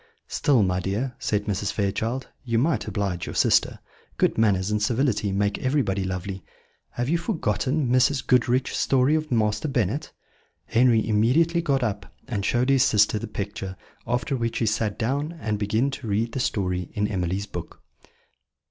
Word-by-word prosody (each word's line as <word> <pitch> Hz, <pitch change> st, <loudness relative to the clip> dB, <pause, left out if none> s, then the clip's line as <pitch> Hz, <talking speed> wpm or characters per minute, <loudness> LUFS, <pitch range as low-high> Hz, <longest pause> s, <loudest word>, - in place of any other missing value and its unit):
"Still, 130 Hz, -7 st, +2 dB
my 90 Hz, -1 st, +1 dB
dear," 105 Hz, +8 st, -2 dB
said 105 Hz, -1 st, -1 dB
Mrs. 100 Hz, -1 st, -1 dB
Fairchild, 110 Hz, +5 st, -2 dB, 0.2 s
"you 115 Hz, -3 st, 0 dB
might 120 Hz, -4 st, +1 dB
oblige 95 Hz, -5 st, -2 dB
your -, -, -6 dB
sister. -, -, +3 dB, 0.4 s
Good -, -, +2 dB
manners 100 Hz, -3 st, +2 dB
and 105 Hz, 0 st, 0 dB
civility 115 Hz, -2 st, +1 dB
make 100 Hz, +1 st, 0 dB
everybody 130 Hz, -8 st, 0 dB
lovely. 95 Hz, 0 st, -4 dB, 0.5 s
Have 120 Hz, +1 st, -2 dB
you 165 Hz, +4 st, +1 dB
forgotten 150 Hz, -, -1 dB
Mrs. 130 Hz, +3 st, +2 dB
Goodriche's 125 Hz, 0 st, +2 dB
story 135 Hz, +2 st, +3 dB
of 155 Hz, -2 st, -1 dB
Master 105 Hz, +2 st, +1 dB
Bennet?" 135 Hz, -, -1 dB, 0.5 s
Henry 115 Hz, -2 st, +3 dB
immediately 135 Hz, +11 st, +3 dB
got 140 Hz, -5 st, +1 dB
up, 105 Hz, -3 st, -3 dB, 0.2 s
and 105 Hz, -5 st, -2 dB
showed 120 Hz, +5 st, +1 dB
his 135 Hz, -1 st, +4 dB
sister 105 Hz, -1 st, +3 dB
the 115 Hz, -, -5 dB
picture, 100 Hz, -2 st, -5 dB, 0.3 s
after 125 Hz, +2 st, 0 dB
which 115 Hz, -2 st, -2 dB
he 115 Hz, -, +1 dB
sat 110 Hz, -1 st, 0 dB
down 140 Hz, +7 st, -1 dB
again 165 Hz, -, -14 dB
and 105 Hz, -5 st, -2 dB
began 110 Hz, +6 st, +1 dB
to 135 Hz, -3 st, -7 dB
read 110 Hz, +3 st, 0 dB
the 130 Hz, -, -3 dB
story 90 Hz, -7 st, -1 dB
in 105 Hz, 0 st, +1 dB
Emily's 95 Hz, -1 st, -2 dB
book. 85 Hz, -5 st, -8 dB
115 Hz, 165 wpm, -25 LUFS, 100-130 Hz, 0.5 s, his